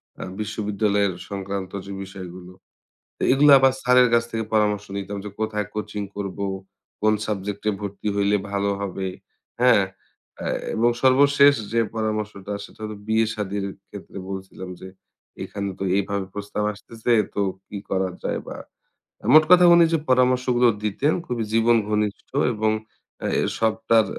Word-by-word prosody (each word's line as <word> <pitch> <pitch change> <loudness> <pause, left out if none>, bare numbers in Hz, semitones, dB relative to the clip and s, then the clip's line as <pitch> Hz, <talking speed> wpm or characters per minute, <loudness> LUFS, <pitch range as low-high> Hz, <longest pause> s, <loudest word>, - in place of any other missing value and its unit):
অ্যা - - -7
বিশ্ববিদ্যালয়ের 105 -2 0 0.2
সংক্রান্ত 100 -1 -4
যে 100 - -8
বিষয়গুলো। 90 -2 -9 0.7
তো - - -18
এগুলো 145 +2 +6
আবার 135 0 +5
স্যারের 125 0 +5
কাছ 115 0 +4
থেকে 115 0 -2
পরামর্শ 105 -1 +2
নিতাম 100 +1 -5
যে - - -4
কোথায় 105 -2 -1
কোচিং 105 -1 -4
করব, 100 -2 -5 0.6
কোন 110 0 +4
সাবজেক্ট 100 -1 -3
এ - - +2
ভর্তি 100 +1 -5
হইলে 100 0 +2 0.2
ভালো 100 0 0
হবে। 95 -1 -3 0.5
হ্যাঁ? 120 -6 +6 0.5
অ্যা - - -4 0.3
এবং 115 +2 +3
সর্বশেষ 140 +2 +6 0.2
যে 115 - +3 0.2
পরামর্শটা 105 -2 -3
সেটা - - -14
হলো 110 0 -5
বিয়ে-শাদির 105 -3 0 0.2
ক্ষেত্রে 100 -1 -10
বলছিলাম 95 -1 -7
যে 95 - -8 0.6
এখানে 100 -1 -4
তো - - -2
এভাবে 100 0 -1
প্রস্তাব 105 +1 -4
আসতেছে 115 +3 -4 0.2
তো 100 - +1 0.3
কি 105 - -7
করা 95 -1 0
যায়? - - -1
বা - - -6 0.8
মোট 155 - +9
কথা 180 0 +8
উনি 170 -1 +7
যে 165 - +4
পরামর্শগুলো 125 -1 +3 0.2
দিতেন, 120 +9 +1
খুবই 120 -5 -2
জীবন 115 +1 +4
ঘনিষ্ঠ 105 -1 -1 0.2
এবং 110 0 +1 0.7
এর - - 0
সবটার 110 0 +3
105 Hz, 145 wpm, -23 LUFS, 100-115 Hz, 0.8 s, মোট